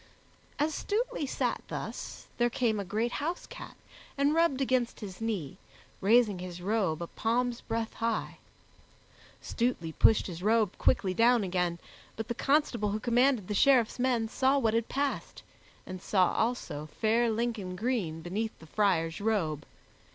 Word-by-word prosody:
As 300 +2 +1
Stutely 440 - -2
sat - - -1
thus, - - -6
there 240 0 +3
came 230 -3 0
a - - -2
great 215 +6 -1
house 330 +7 -3
cat - - -10 0.4
and 280 +2 +3
rubbed 330 -5 +2
against 255 -3 0
his 195 -1 -8
knee, 200 -11 -3 0.4
raising 215 -1 +4
his 180 -1 -7
robe 185 -4 0
a - - -3
palm's 235 +5 -1
breadth 225 0 -3
high. 230 -1 -2 1.0
Stutely 230 -9 -1
pushed 215 +6 +4
his 175 -2 -6
robe 220 +2 +2
quickly 185 -2 +2
down 235 +2 +4
again, 180 -2 -1 0.4
but 225 - -5
the - - 0
constable 275 -5 +1
who 210 +2 -2
commanded 245 -2 +2
the 210 - -2
Sheriffs 250 0 +4
men 245 -3 +1
saw 265 +4 +2
what 225 -5 +2
had 230 0 0
passed, 280 0 -3 0.4
and 185 -1 -7
saw 185 -3 +2
also 225 -10 -2
fair 230 +2 +3
Lincoln 220 -5 -2
green 190 -7 -2
beneath 215 +6 -3
the 160 - -14
friar's 165 -2 0
robe. 175 -9 -1
225 Hz, 150 wpm, -30 LUFS, 190-245 Hz, 1.0 s, raising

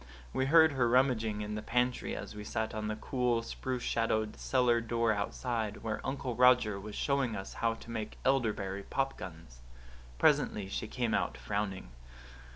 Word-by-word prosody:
We 130 - +1
heard 160 +1 +7
her 125 -4 +2
rummaging 115 -4 +2
in 105 0 -4
the 105 - -3
pantry 125 +2 0
as - - -6
we 105 0 -7
sat 110 +1 -2
on 110 -1 -3
the 110 - -2
cool, 120 0 0
spruce 125 +1 -4
shadowed 110 -2 0
cellar 125 -3 +2
door 115 0 +1
outside, 110 +1 -3
where 110 -1 -2
Uncle 130 -2 -3
Roger 125 -5 +5
was 105 +1 -8
showing 135 -5 0
us 95 - -6
how 115 -1 +2
to 115 - -11
make 110 -2 -4
elderberry 105 -7 +1
pop 135 +6 -1
guns. 80 -9 -10 0.6
Presently 100 +9 +2
she 110 - -3
came 120 0 -1
out, - - 0
frowning. 100 -7 -3
115 Hz, 165 wpm, -32 LUFS, 105-125 Hz, 0.6 s, heard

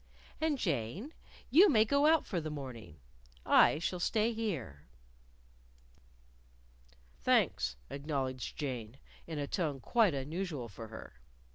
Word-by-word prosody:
"And, 315 -2 +1
Jane, 170 - -2 0.4
you 360 +9 +8
may 220 -7 +5
go 280 +6 +3
out 320 -1 +4
for 175 -4 -2
the 155 - -4
morning. 125 - -8 0.5
I - - +6
shall 175 +2 -2
stay 220 +5 +1
here." 150 - -4 2.3
"Thanks," - - +2
acknowledged 135 -3 -4
Jane, 125 -5 -4 0.3
in 160 -2 -5
a 145 - -1
tone 150 -3 -2
quite 210 - +2
unusual 145 -2 -4
for 110 +2 -9
her. 110 - -11
150 Hz, 120 wpm, -33 LUFS, -, 2.3 s, you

